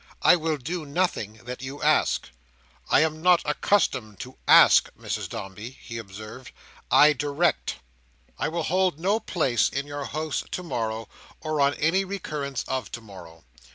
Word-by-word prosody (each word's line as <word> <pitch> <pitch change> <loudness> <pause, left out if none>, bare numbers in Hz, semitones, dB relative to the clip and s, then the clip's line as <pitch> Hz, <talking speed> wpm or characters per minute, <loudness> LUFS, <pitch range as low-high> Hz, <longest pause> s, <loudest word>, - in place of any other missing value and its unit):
I - - +7
will 160 -2 -1
do 160 +6 -4
nothing 145 - -1
that 125 +1 -7
you 135 +2 -7
ask." - - +2 0.6
"I - - +5
am 155 0 0
not 180 0 +5
accustomed 150 - 0
to 130 +1 -9
ask, - - +7
Mrs - - -4
Dombey," 100 +4 -7
he 115 -1 -7
observed; 110 +4 -10 0.4
"I 150 +1 +7
direct." 145 +4 0 0.6
"I - - 0
will 165 +2 -2
hold 185 -2 +1
no 200 +6 +1
place 140 - +1
in 140 +1 -3
your 145 -1 -5
house 155 +1 -3
to 180 - -4
morrow, 115 -8 -3 0.3
or 155 -2 -2
on 140 +1 +3
any 170 +6 +2
recurrence 150 -8 -4
of 130 -1 -3
to 120 - -5
morrow. 95 -6 -13
145 Hz, 155 wpm, -25 LUFS, 120-165 Hz, 0.6 s, I